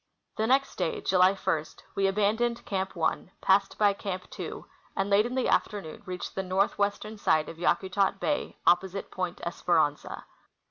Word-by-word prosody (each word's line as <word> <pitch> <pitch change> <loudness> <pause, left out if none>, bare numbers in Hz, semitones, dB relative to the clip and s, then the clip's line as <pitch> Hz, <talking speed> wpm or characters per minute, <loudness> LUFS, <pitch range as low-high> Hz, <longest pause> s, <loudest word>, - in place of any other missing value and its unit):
The 220 - 0
next 270 +2 +2
day, 460 - -1
July 185 - +4
1, 160 -5 -1 0.3
we 195 0 +2
abandoned 215 +4 +1
Camp 190 -1 -2
1, 170 +2 -1
passed 195 +1 +2
by 205 -1 +4
Camp 185 -2 -5
2, - - -6 0.3
and 195 +1 -1
late 205 +3 +5
in 250 - -5
the 260 - +1
afternoon 195 -7 -1
reached 180 -1 -5
the 190 - -2
northwestern 200 +3 0
side 155 -5 +2
of 165 - -9
Yakutat 195 +2 +1
bay, 290 +7 -1
opposite 190 +2 +2
Point 180 -1 -3
Esperanza. 160 -4 0
195 Hz, 155 wpm, -28 LUFS, 180-210 Hz, 0.3 s, late